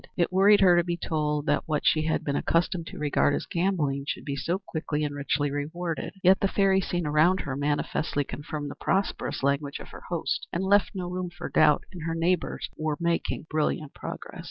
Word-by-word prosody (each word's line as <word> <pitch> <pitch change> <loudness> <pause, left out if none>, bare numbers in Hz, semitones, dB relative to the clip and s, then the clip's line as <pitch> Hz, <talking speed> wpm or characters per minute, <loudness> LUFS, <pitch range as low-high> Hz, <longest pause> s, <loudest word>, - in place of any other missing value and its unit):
It 175 0 +1
worried 200 +2 +6
her 180 -2 +7
to 175 - +4
be 170 0 -2
told 150 -3 -1
that - - 0
what 150 -2 -1
she 155 - +4
had 160 - 0
been 140 - -1
accustomed 170 +1 0
to - - -8
regard 145 -1 +2
as - - -3
gambling 160 -7 0
should - - -4
be 140 - -2
so 170 +6 -1
quickly 160 -5 -3
and 145 -1 -2
richly 145 0 -1
rewarded. 160 +6 -4
Yet 190 +1 +6
the 195 - +2
fairy 195 -1 +3
scene 175 -2 -2
around 155 +5 +3
her 130 - -4
manifestly 145 +1 -1
confirmed 145 +1 -6
the - - -12
prosperous 190 -7 -1
language 140 +1 0
of - - -11
her - - -11
host - - -2
and 175 - -1
left 200 +1 +3
no 180 -2 -3
room 180 0 -3
for 175 0 -7
doubt 150 - +4
that 180 - -8
her 165 - -1
neighbors 170 +1 0
were 155 -1 -2
making 170 -1 -1
brilliant 155 -1 -1
progress. - - -8
165 Hz, 205 wpm, -27 LUFS, 145-180 Hz, -, her